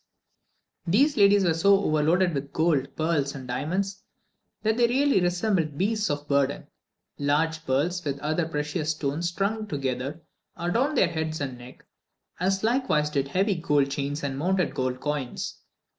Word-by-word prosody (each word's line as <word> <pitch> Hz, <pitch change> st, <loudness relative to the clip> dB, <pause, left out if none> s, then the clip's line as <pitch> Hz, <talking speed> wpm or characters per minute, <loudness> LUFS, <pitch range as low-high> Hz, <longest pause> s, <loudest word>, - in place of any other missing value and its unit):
These 275 Hz, -, +3 dB
ladies 200 Hz, -2 st, +5 dB
were 170 Hz, -3 st, +3 dB
so 195 Hz, +5 st, +4 dB
overloaded 170 Hz, +1 st, +2 dB
with 140 Hz, -1 st, -4 dB
gold, 155 Hz, -5 st, +1 dB
pearls, 155 Hz, -4 st, 0 dB
and 130 Hz, -2 st, -8 dB
diamonds, 185 Hz, +10 st, -2 dB, 0.6 s
that 220 Hz, 0 st, +2 dB
they 240 Hz, 0 st, +4 dB
really 270 Hz, -3 st, +3 dB
resembled 175 Hz, -4 st, 0 dB
beasts 210 Hz, +3 st, 0 dB
of 145 Hz, 0 st, -3 dB
burden. 140 Hz, -1 st, +1 dB, 0.5 s
Large 160 Hz, +3 st, 0 dB
pearls, 165 Hz, +7 st, 0 dB
with 140 Hz, -2 st, -2 dB
other 155 Hz, +3 st, -1 dB
precious 150 Hz, 0 st, -2 dB
stones 155 Hz, +2 st, -1 dB
strung 210 Hz, +4 st, -2 dB
together, 140 Hz, +1 st, -3 dB, 0.3 s
adorned 235 Hz, -, 0 dB
their 190 Hz, -, +5 dB
head 160 Hz, -1 st, -3 dB
and 135 Hz, -3 st, -3 dB
neck, 125 Hz, +1 st, -13 dB, 0.5 s
as 190 Hz, +2 st, 0 dB
likewise 225 Hz, -, +1 dB
did 140 Hz, -2 st, 0 dB
heavy 195 Hz, +8 st, +1 dB
gold 145 Hz, -5 st, +1 dB
chains 145 Hz, +1 st, -3 dB
and 135 Hz, -1 st, -3 dB
mounted 180 Hz, +2 st, +1 dB
gold 130 Hz, -1 st, -2 dB
coins. 145 Hz, -4 st, -4 dB
160 Hz, 150 wpm, -26 LUFS, 145-190 Hz, 0.6 s, ladies